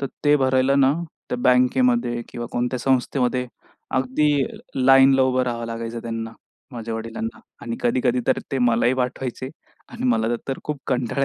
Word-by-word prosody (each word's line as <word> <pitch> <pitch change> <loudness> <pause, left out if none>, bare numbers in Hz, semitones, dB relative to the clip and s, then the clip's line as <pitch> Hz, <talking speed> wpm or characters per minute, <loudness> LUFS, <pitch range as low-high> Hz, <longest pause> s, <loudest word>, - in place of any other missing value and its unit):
तर 140 - -1 0.2
ते 145 0 +5
भरायला 130 0 +2
ना, 135 0 +4 0.4
तर 125 - -1
बँकेमध्ये 125 - +2
किंवा 120 -1 -6
कोणत्या 125 +1 -1
संस्थेमध्ये 125 -1 +1 0.5
अगदी 130 +4 +1 0.5
लाईनला 135 0 +6
उभं 130 0 +2
राहावं 120 -2 -3
लागायचं 115 0 -5
त्यांना, 115 -1 -4 0.4
माझ्या 115 -1 -5
वडिलांना 115 0 -5 0.2
आणि 115 0 -4
कधी-कधी 125 0 +1
तर - - +3
ते 135 - 0
मलाही 120 0 +3
पाठवायचे 130 0 -3 0.4
आणि - - -7
मला 115 +1 +1
तर 135 - -2
खूप 150 -2 -3
कंटाळा 130 +1 0
125 Hz, 150 wpm, -22 LUFS, 120-135 Hz, 0.5 s, लाईनला